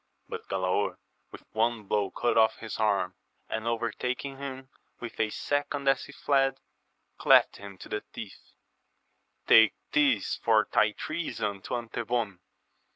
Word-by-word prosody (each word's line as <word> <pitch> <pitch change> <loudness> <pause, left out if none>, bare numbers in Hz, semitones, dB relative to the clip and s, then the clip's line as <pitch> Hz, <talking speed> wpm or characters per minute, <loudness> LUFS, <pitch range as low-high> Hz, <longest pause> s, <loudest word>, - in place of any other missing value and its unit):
But - - -7
Galaor 95 +1 0 0.3
with - - -11
one 115 0 0
blow 100 -1 0
cut 120 - 0
off 110 -1 +4
his 110 -1 -7
arm, 100 -4 +1 0.3
and 110 +1 -3
overtaking 125 +4 -2
him 135 -1 -7 0.3
with 120 - -8
a 110 - +2
second 145 +3 -2
as 135 -1 +3
he - - -11
fled, 135 -1 +1 0.6
cleft - - +5
him 100 -1 -10
to - - -11
the 105 - -2
teeth: 105 -3 -10 0.9
Take 110 -1 +7 0.2
this 290 -3 +2
for 110 -2 +3
thy 110 -3 +3
treason 110 -12 -3
to - - -4
Antebon 115 -4 -2
115 Hz, 140 wpm, -28 LUFS, 105-135 Hz, 0.9 s, Take